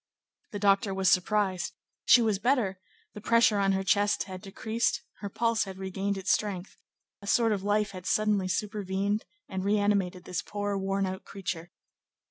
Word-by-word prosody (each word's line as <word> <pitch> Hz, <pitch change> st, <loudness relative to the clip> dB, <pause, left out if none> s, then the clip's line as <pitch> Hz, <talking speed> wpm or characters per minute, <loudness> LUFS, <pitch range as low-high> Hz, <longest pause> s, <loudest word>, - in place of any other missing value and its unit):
The 205 Hz, -, -4 dB
doctor 200 Hz, -1 st, +2 dB
was 190 Hz, -1 st, +3 dB
surprised; 190 Hz, -1 st, +1 dB, 0.3 s
she 240 Hz, -, +7 dB
was 215 Hz, -3 st, +1 dB
better; 230 Hz, -6 st, +1 dB, 0.3 s
the 210 Hz, -, -9 dB
pressure 230 Hz, -1 st, +4 dB
on 195 Hz, -1 st, +3 dB
her 190 Hz, 0 st, 0 dB
chest 205 Hz, +2 st, +2 dB
had 185 Hz, -1 st, -8 dB
decreased; 220 Hz, +4 st, -1 dB, 0.2 s
her 200 Hz, -, -5 dB
pulse 230 Hz, +2 st, +1 dB
had 190 Hz, -1 st, -8 dB
regained 195 Hz, +1 st, -2 dB
its 195 Hz, 0 st, 0 dB
strength; 200 Hz, -3 st, -1 dB, 0.5 s
a 200 Hz, -, -10 dB
sort 230 Hz, +1 st, +3 dB
of 200 Hz, -3 st, 0 dB
life 205 Hz, +1 st, +1 dB
had 185 Hz, -1 st, -8 dB
suddenly 210 Hz, -3 st, +2 dB
supervened 205 Hz, +1 st, -1 dB, 0.2 s
and 190 Hz, 0 st, -4 dB
reanimated 200 Hz, -3 st, +1 dB
this 180 Hz, -1 st, -3 dB
poor, 205 Hz, 0 st, -3 dB
worn 195 Hz, 0 st, 0 dB
out 190 Hz, 0 st, -5 dB
creature. 175 Hz, -3 st, -5 dB
200 Hz, 165 wpm, -28 LUFS, 190-210 Hz, 0.5 s, she